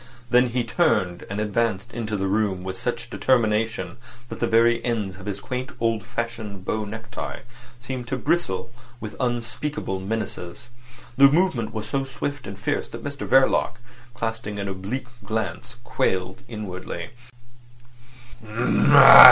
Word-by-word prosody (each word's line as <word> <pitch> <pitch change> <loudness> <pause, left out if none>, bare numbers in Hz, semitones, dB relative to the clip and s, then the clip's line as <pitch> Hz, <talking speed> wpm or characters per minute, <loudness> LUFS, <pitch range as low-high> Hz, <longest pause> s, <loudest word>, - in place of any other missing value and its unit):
Then 125 +1 +5
he 120 +1 0
turned, 90 -6 +1
and 100 +1 -3
advanced 110 0 0
into 110 -3 -2
the 95 - -1
room 95 -2 0
with 95 0 -4
such 120 +3 -4
determination 110 -8 +1 0.3
that - - -7
the 120 - +1
very 115 +1 +4
ends 105 -6 -2
of 95 - -11
his 100 -1 -3
quaintly 125 +5 -5
old 115 -3 +1
fashioned 110 -4 -5
bow 110 +1 -1
necktie 110 +3 -6 0.4
seemed 125 0 -5
to 130 - -2
bristle 130 - 0 0.3
with 110 -2 -7
unspeakable 120 -2 -2
menaces. 100 0 -5 0.5
The 140 +1 +9
movement 145 -8 +1
was 110 -1 -5
so 135 +5 0
swift 135 +1 -5
and 100 -1 -7
fierce 100 - -2
that 115 - -8
Mr 140 -1 -5
Verloc, 135 0 +4 0.4
casting 110 -3 -3
an 100 -1 -3
oblique 100 +8 -4 0.2
glance, 110 +3 -3
quailed 95 0 -1
inwardly. 95 -4 -6
115 Hz, 135 wpm, -24 LUFS, 100-120 Hz, 0.5 s, The